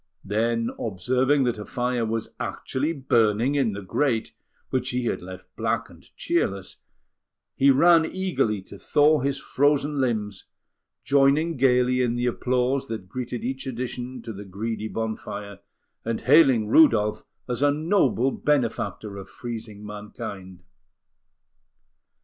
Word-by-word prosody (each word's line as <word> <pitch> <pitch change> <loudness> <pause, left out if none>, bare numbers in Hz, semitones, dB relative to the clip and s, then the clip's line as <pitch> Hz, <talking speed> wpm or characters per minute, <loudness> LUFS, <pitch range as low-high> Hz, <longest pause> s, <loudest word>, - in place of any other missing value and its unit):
Then, 115 +3 0
observing 130 +7 +1
that 120 -4 -1
a - - -5
fire 125 -1 -1
was 115 0 -3
actually 145 +5 -2
burning 120 -4 +2
in 135 -7 +1
the 100 0 -6
grate, 115 +4 0 0.4
which 130 0 0
he 125 -1 -2
had - - -1
left 90 0 -11
black - - -2
and - - -16 0.2
cheerless, 95 -1 -1 0.8
he 140 - +4
ran 165 +4 +5
eagerly 165 - -1
to 100 +1 -12
thaw 150 +1 +3
his 140 +1 -1
frozen 145 +1 +1
limbs, 105 -6 -2 0.6
joining 140 +4 +3
gaily 125 -1 +3
in 120 -1 +1
the 120 0 -1
applause 130 +2 0
that 110 -6 -6
greeted 125 -1 -5
each 135 +2 -4
addition 125 0 -5
to 115 - -6
the 100 +1 -8
greedy 110 +3 -4
bonfire, 105 -2 -5 0.4
and 115 0 -2
hailing 130 -6 +5
Rudolf 110 -5 +4 0.2
as 125 0 -3
a 145 - +5
noble 145 - +2
benefactor 115 -8 -1
of 95 - -9
freezing 110 -3 -7
mankind. 105 -3 -8
120 Hz, 130 wpm, -25 LUFS, 105-135 Hz, 0.8 s, ran